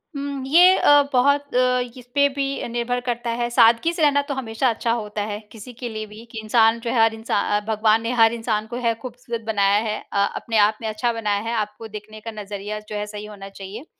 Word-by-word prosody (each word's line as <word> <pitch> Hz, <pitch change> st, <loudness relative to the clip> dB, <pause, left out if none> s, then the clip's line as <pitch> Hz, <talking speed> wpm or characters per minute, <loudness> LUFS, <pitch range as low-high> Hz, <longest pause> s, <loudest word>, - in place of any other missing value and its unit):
हुँ। 280 Hz, -1 st, -4 dB
ये 355 Hz, +6 st, +7 dB
अ, 290 Hz, 0 st, +6 dB
बहुत 280 Hz, +2 st, +2 dB
अ, 250 Hz, 0 st, +3 dB, 0.2 s
इस 245 Hz, -, -14 dB
पे 285 Hz, 0 st, +5 dB
भी 275 Hz, -1 st, -2 dB
निर्भर 240 Hz, +1 st, -2 dB
करता 240 Hz, 0 st, -2 dB
है 240 Hz, 0 st, 0 dB
सादगी 235 Hz, +6 st, +4 dB
से 335 Hz, -, -4 dB
रहना 285 Hz, -1 st, +4 dB
तो -, -, 0 dB
हमेशा 255 Hz, -1 st, -1 dB
अच्छा 230 Hz, 0 st, -1 dB
होता 210 Hz, -2 st, -3 dB
है 205 Hz, -, -4 dB
किसी 230 Hz, +3 st, -11 dB
के 240 Hz, +1 st, -6 dB
लिए 215 Hz, -1 st, -5 dB
भी 215 Hz, +1 st, -12 dB
कि 225 Hz, -, -6 dB
इंसान 225 Hz, +1 st, +3 dB
जो 230 Hz, 0 st, -4 dB
है 240 Hz, -, +1 dB
हर 225 Hz, 0 st, +4 dB
इंसान 210 Hz, -2 st, 0 dB
अ 210 Hz, -, -18 dB
भगवान 220 Hz, 0 st, +2 dB
ने 230 Hz, +1 st, -2 dB
हर 225 Hz, 0 st, +6 dB
इंसान 225 Hz, -2 st, -2 dB
को 240 Hz, +2 st, -6 dB
है 230 Hz, -, +3 dB
खूबसूरत 240 Hz, -1 st, -6 dB
बनाया 200 Hz, -2 st, +3 dB
है। 215 Hz, -, -2 dB, 0.2 s
अ, -, -, -1 dB, 0.2 s
अपने 225 Hz, -1 st, -2 dB
आप 215 Hz, 0 st, -4 dB
में 220 Hz, -, -3 dB
अच्छा 225 Hz, +3 st, -1 dB
बनाया 210 Hz, -3 st, -1 dB
है, 235 Hz, -, -2 dB
आपको 215 Hz, +1 st, -4 dB
देखने 215 Hz, 0 st, -10 dB
का 225 Hz, +1 st, -6 dB
नज़रिया 210 Hz, 0 st, -6 dB
जो 210 Hz, -, -5 dB
है 210 Hz, 0 st, -2 dB
सही 210 Hz, 0 st, -7 dB
होना 200 Hz, -2 st, -10 dB
चाहिए। 195 Hz, +6 st, -9 dB
225 Hz, 235 wpm, -22 LUFS, 215-245 Hz, 0.2 s, ये